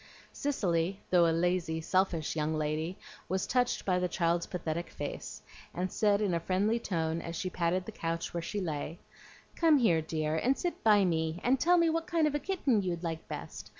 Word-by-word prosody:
Cicely, 190 - 0
though 175 -2 +6
a - - +3
lazy, 170 -1 0
selfish 170 -2 0
young 155 0 0
lady, 155 +3 -2 0.3
was 190 0 0
touched 250 -1 0
by 180 -2 +2
the 180 - +1
child's 170 -1 0
pathetic 170 -1 -3
face, 145 - -6 0.3
and 180 +1 -2
said 205 -1 +2
in 200 -4 +1
a 170 - +1
friendly 195 +7 +1
tone, 165 -5 -1
as 170 - -6
she 185 +2 -3
patted 180 +1 0
the - - -6
couch 165 -4 -3
where 170 - -2
she 205 +5 -3
lay, 160 -2 -3 0.6
"Come 325 -3 +5
here, 180 -11 +3
dear, 155 -1 -2
and 255 +12 +2
sit 350 - -3
by 210 -3 +5
me, 160 -1 0
and 255 +2 +3
tell 355 +1 +4
me 335 -1 +4
what 330 +1 0
kind 335 -3 +2
of 300 - +1
a 295 - 0
kitten 285 - +1
you'd 180 -2 -3
like 165 -1 -4
best. - - -7
180 Hz, 200 wpm, -31 LUFS, 165-215 Hz, 0.6 s, though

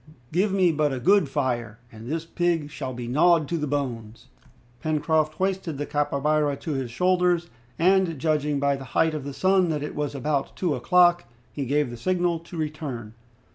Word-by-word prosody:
"Give 190 +5 +1
me 185 -3 +3
but 150 -2 +1
a 130 - -3
good 190 0 +3
fire, 120 -6 -2
and 110 +1 -11
this 160 +3 -3
pig 165 -3 -1
shall 135 -3 -5
be 120 -1 -6
gnawed 160 +4 +3
to 170 - 0
the 150 - -2
bones!" 120 -6 -4 0.5
Pencroft 155 0 +1
hoisted 190 -5 -2
the 145 - -3
capybara 145 +1 +1
on 155 - -4
his 130 -2 -3
shoulders, 180 +4 +1 0.3
and 185 -1 +3
judging 150 0 0
by 140 0 +2
the 135 - -8
height 160 -1 +3
of 150 -3 -4
the 140 - -4
sun 190 -2 +3
that 150 -2 -1
it 150 - -5
was 145 -1 -3
about 140 0 -2
two 175 -5 0
o'clock, 175 0 +4 0.3
he 140 - -3
gave 145 -1 +1
the 120 - -7
signal 175 +4 0
to 170 +1 -11
return. 145 -8 -5
150 Hz, 185 wpm, -25 LUFS, 140-175 Hz, 0.5 s, o'clock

